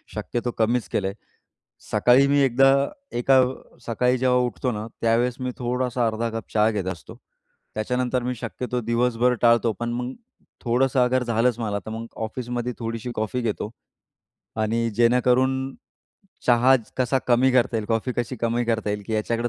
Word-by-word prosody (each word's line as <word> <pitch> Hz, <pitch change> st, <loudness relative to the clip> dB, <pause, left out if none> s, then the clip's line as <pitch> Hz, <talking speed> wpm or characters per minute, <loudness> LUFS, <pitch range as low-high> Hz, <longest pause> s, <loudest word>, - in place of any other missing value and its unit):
शक्यतो 120 Hz, 0 st, -3 dB
कमीच 115 Hz, +2 st, +1 dB
केलंय. 95 Hz, 0 st, -1 dB, 0.8 s
सकाळी 125 Hz, +3 st, +5 dB
मी 140 Hz, +1 st, +3 dB
एकदा 135 Hz, +1 st, +5 dB, 0.5 s
एका 130 Hz, +2 st, +5 dB, 0.5 s
सकाळी 125 Hz, +2 st, +1 dB
जेव्हा 125 Hz, 0 st, +3 dB
उठतो 125 Hz, +2 st, -3 dB
ना 105 Hz, 0 st, -5 dB
त्यावेळेस 115 Hz, +2 st, +2 dB
मी 130 Hz, 0 st, -2 dB
थोडासा 125 Hz, -1 st, -1 dB
अर्धा 115 Hz, +1 st, -1 dB
कप 115 Hz, 0 st, -6 dB
चहा 110 Hz, 0 st, +3 dB
घेत 100 Hz, -4 st, -3 dB
असतो. 80 Hz, -5 st, -12 dB, 0.6 s
त्याच्यानंतर 125 Hz, +3 st, -1 dB
मी 125 Hz, +1 st, -2 dB
शक्यतो 125 Hz, +1 st, -4 dB
दिवसभर 120 Hz, +1 st, +1 dB
टाळतो. 115 Hz, -1 st, +4 dB
पण 120 Hz, -, -2 dB
मग 125 Hz, +1 st, -3 dB, 0.5 s
थोडंसं 130 Hz, +2 st, +2 dB
अगर 125 Hz, +1 st, +1 dB
झालंच 120 Hz, 0 st, +1 dB
मला, 105 Hz, -3 st, -2 dB
तर 100 Hz, -, -9 dB
मग 115 Hz, +1 st, -5 dB, 0.2 s
ऑफिसमध्ये 120 Hz, +1 st, -4 dB
थोडीशी 115 Hz, +1 st, -4 dB
कॉफी 110 Hz, +3 st, -2 dB
घेतो 110 Hz, -2 st, -3 dB, 0.9 s
आणि 115 Hz, +2 st, 0 dB
जेणेकरून 125 Hz, +3 st, +2 dB, 0.7 s
चहा 125 Hz, +2 st, +5 dB, 0.2 s
कसा 130 Hz, +1 st, +1 dB
कमी 125 Hz, +2 st, +4 dB
करता 125 Hz, -2 st, +2 dB
येईल, 110 Hz, -, -2 dB
कॉफी 115 Hz, +3 st, -1 dB
कशी 120 Hz, +1 st, -2 dB
कमी 120 Hz, +1 st, 0 dB
करता 110 Hz, -2 st, -1 dB
येईल 105 Hz, 0 st, -3 dB
की 110 Hz, -, -4 dB
याच्याकडे 115 Hz, +2 st, -1 dB
120 Hz, 155 wpm, -24 LUFS, 115-125 Hz, 0.9 s, सकाळी